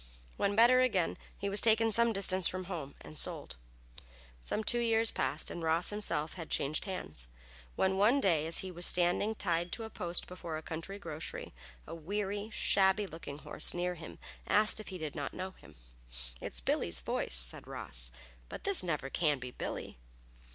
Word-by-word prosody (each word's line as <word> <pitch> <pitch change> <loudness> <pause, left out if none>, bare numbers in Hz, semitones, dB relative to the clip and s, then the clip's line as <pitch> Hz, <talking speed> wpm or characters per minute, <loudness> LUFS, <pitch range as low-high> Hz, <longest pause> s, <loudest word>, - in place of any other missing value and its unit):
When 200 0 0
better 240 +3 +6
again, 195 -10 +1 0.2
he 200 - -3
was 200 +1 +5
taken 225 0 +4
some 235 +2 +4
distance 190 -3 +3
from 185 0 -3
home 165 -7 -6
and 155 - -3
sold. - - 0 0.9
Some 210 - -1
two 240 +3 +1
years 225 -1 +3
passed 135 +4 -1
and 170 - -6
Ross 165 +3 +2
himself 170 -7 +2
had 165 -3 -8
changed 150 +7 0
hands, 75 - -4 0.5
when 190 0 +1
one 225 +8 +4
day 165 - +2
as 165 - +5
he 185 - -5
was 175 0 -1
standing 180 +5 +1
tied 175 -3 -1
to 230 - -2
a 220 - -7
post 175 -1 -1
before 175 -3 -6
a 160 - -8
country 165 +6 -5
grocery, 160 -5 -6 0.3
a - - -8
weary, 200 +5 -3
shabby 195 0 +4
looking 160 -6 -8
horse 150 - -1
near 180 +1 -1
him 165 -2 -10 0.3
asked 210 +1 +4
if 215 - -9
he 185 - -6
did 155 -3 -5
not 145 -2 -5
know 185 +1 -4
him. 80 - -18 0.7
"It's 60 - -3
Billy's - - +1
voice," - - 0
said - - +2
Ross, - - -2 0.4
"but - - -8
this 395 -2 +7
never 150 -6 -2
can 150 -4 +2
be 125 -1 -7
Billy." 60 - -6
180 Hz, 180 wpm, -32 LUFS, 155-205 Hz, 0.9 s, this